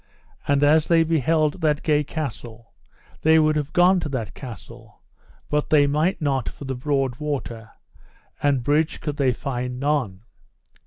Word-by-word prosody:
And 140 0 +2
as 155 +2 +4
they 165 -1 +4
beheld 160 +1 +1
that 150 -2 +1
gay 150 -1 +2
castle 120 -7 -7 0.5
they 160 +1 +5
would 155 -1 +3
have 150 -1 -2
gone 180 +1 +4
to 155 - -4
that 125 -6 -4
castle, 110 - -11 0.5
but 150 0 -1
they 145 -2 +5
might 155 +5 0
not 135 -5 -1
for 145 - -11
the 135 - -3
broad 135 -1 -1
water, 130 -7 -5 0.7
and 140 -4 +1
bridge 150 +4 +1
could 150 -2 -4
they 135 -4 +2
find 125 0 -4
none. 130 -9 -1
145 Hz, 155 wpm, -23 LUFS, 130-155 Hz, 0.7 s, they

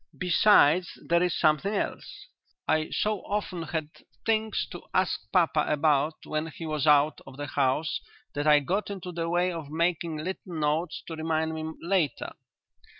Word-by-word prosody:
Besides 180 -2 +4
there 170 0 +3
is 180 -1 +1
something 165 +6 +2
else. - - -4 0.4
I 155 0 +1
so 210 -1 0
often 200 -4 -3
had 160 -1 -4 0.3
things 220 -1 +1
to 175 - -7
ask 185 0 0
papa 165 -4 +3
about 150 0 +2
when 155 +1 -2
he 165 +1 -8
was 155 -1 -1
out 150 +1 +4
of 135 0 -11
the 145 - -4
house 145 +3 0 0.3
that 145 +1 -2
I 150 -1 +6
got 190 +8 -1
into 190 -3 -6
the 165 -1 -3
way 175 +1 +1
of 165 -4 -6
making 165 0 -1
little 180 +2 -5
notes 155 +2 -1
to 165 - -6
remind 160 0 -1
me 160 0 -4
later. 170 -6 0
160 Hz, 160 wpm, -27 LUFS, 150-180 Hz, 0.4 s, I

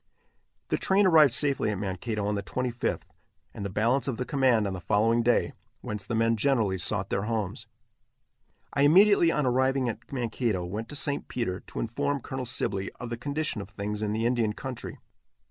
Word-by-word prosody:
The - - 0
train 195 +1 +3
arrived 155 -6 +6
safely 140 -6 +2
at 105 - -2
Mankato 100 +2 -3
on 105 - 0
the 100 - -1
25th, 120 +5 -2 0.5
and - - -6
the 100 - -3
balance 115 +9 +1
of 130 -4 -2
the 125 - -2
command 130 -6 +2
on 100 - -2
the 90 - -6
following 115 +6 +2
day, 120 +1 +2 0.3
whence 105 -2 -5
the 120 - -2
men 115 +1 +2
generally 110 -7 +1
sought 100 +1 -1
their 95 - 0
homes. 110 0 -3 1.1
I 140 - +1
immediately, 175 +3 +6
on 150 -3 0
arriving 130 0 +2
at 115 - -8
Mankato, 115 -7 -1
went 105 +6 -5
to - - -7
St. 145 0 -2
Peter, 95 -7 -2
to - - -6
inform 140 +5 -1
Colonel 130 0 -5
Sibley 100 -5 -2
of 120 -1 -8
the - - -1
condition 145 -3 -2
of 100 - -9
things 105 +1 -4
in 105 -1 -1
the 110 +2 -1
Indian 120 -3 +1
country. 130 +1 -7
115 Hz, 190 wpm, -27 LUFS, 105-135 Hz, 1.1 s, arrived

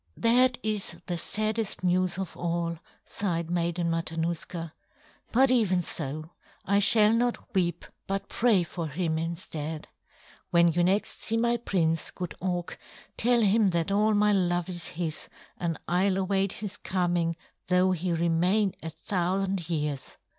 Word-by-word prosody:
"That 245 +2 +4
is 215 -2 -2
the 175 - -2
saddest 215 +1 -1
news 180 0 +1
of 190 -3 -5
all," 170 -1 -2 0.3
sighed 170 -4 -2
Maiden 170 0 0
Matanuska. 165 0 -3 0.6
"But 260 +2 +4
even 195 -8 +2
so, 155 +1 -3 0.3
I 200 +2 +3
shall 210 +1 +7
not 240 +1 -1
weep 175 -3 0 0.2
but 195 0 -2
pray 225 -7 +2
for 170 0 -5
him 160 +1 -1
instead. 160 -2 -5 0.6
When 170 0 +5
you 175 +1 +2
next 195 +4 +1
see 225 - +1
my 235 +1 +2
prince, 165 -8 0
good 180 -2 -6
Auk, 175 -1 -3 0.4
tell 240 +1 +3
him 210 0 +4
that 170 +1 -1
all 210 +2 +3
my 210 0 +4
love 175 -2 +1
is 175 -2 -4
his, 160 -2 -4 0.3
and 165 -3 -2
I'll 185 +3 +2
await 195 0 +1
his 205 -1 -5
coming 175 -2 0 0.3
though 180 +1 +3
he 180 0 -1
remain 175 +4 +2
a 165 - -5
thousand 185 +1 -2
years." 150 -4 -3
180 Hz, 145 wpm, -27 LUFS, 170-200 Hz, 0.6 s, shall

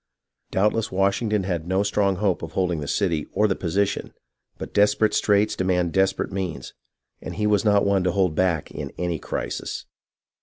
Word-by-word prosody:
Doubtless 105 +3 +1
Washington 100 +2 +1
had 85 -3 -3
no 95 +2 +1
strong 100 -1 +1
hope 95 -1 0
of 80 0 -7
holding 90 -3 0
the 75 - -5
cit}' 85 -4 0
or 105 - +3
the 95 - 0
position, 95 +3 -1 0.4
but - - -7
desperate 105 +1 +3
straits 105 +1 +2
demand 90 -3 0
desperate 95 0 +1
means, 95 -4 -4 0.5
and - - -6
he 105 - -1
was 105 -1 +3
not 105 -2 +3
one 100 -2 +2
to 90 - +2
hold 90 -2 +1
back 85 -2 0
in 70 -2 -6
any 85 -3 -2
crisis. - - -4
95 Hz, 175 wpm, -24 LUFS, 90-105 Hz, 0.5 s, or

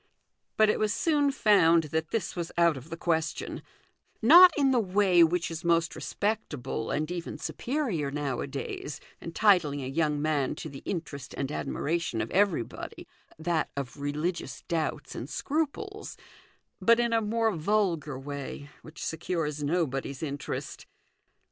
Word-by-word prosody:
But 215 -1 +6
it - - -2
was 215 -1 +1
soon 295 +2 +2
found 170 -10 +5
that 160 -1 0
this 225 - -2
was 170 -2 -4
out 170 -2 +4
of 135 +4 -10
the 165 - -5
question; 160 -2 -1 0.6
not 345 +10 +9
in 275 -2 +4
the 250 - +4
way 190 -3 +4
which 170 +1 +1
is 165 0 -6
most 170 -1 +2
respect 210 -5 -2
able 125 -3 -4
and 155 +3 -1
even 175 -1 -5
superior 235 - -2
nowadays, 140 0 -4 0.2
entitling 165 -6 +2
a - - -4
young 150 +1 0
man 145 -3 0
to 155 - -7
the 135 -1 -9
interest 150 -7 -5
and 135 0 -2
admiration 165 -4 -2
of 110 +1 -3
everybody 185 - -1 0.3
that 160 0 0
of 140 -1 -4
religious 150 0 -3
doubts 165 -2 -2
and - - -6
scruples 325 +8 -3 0.6
but 230 +1 +5
in 235 -1 +1
a 225 - +3
more 225 +1 +1
vulgar 170 -5 0
way, 140 +1 -7
which 155 - -8
secures 160 -3 -2
nobody's 145 -3 -1
interest. 140 -2 -5
165 Hz, 145 wpm, -28 LUFS, 145-210 Hz, 0.6 s, not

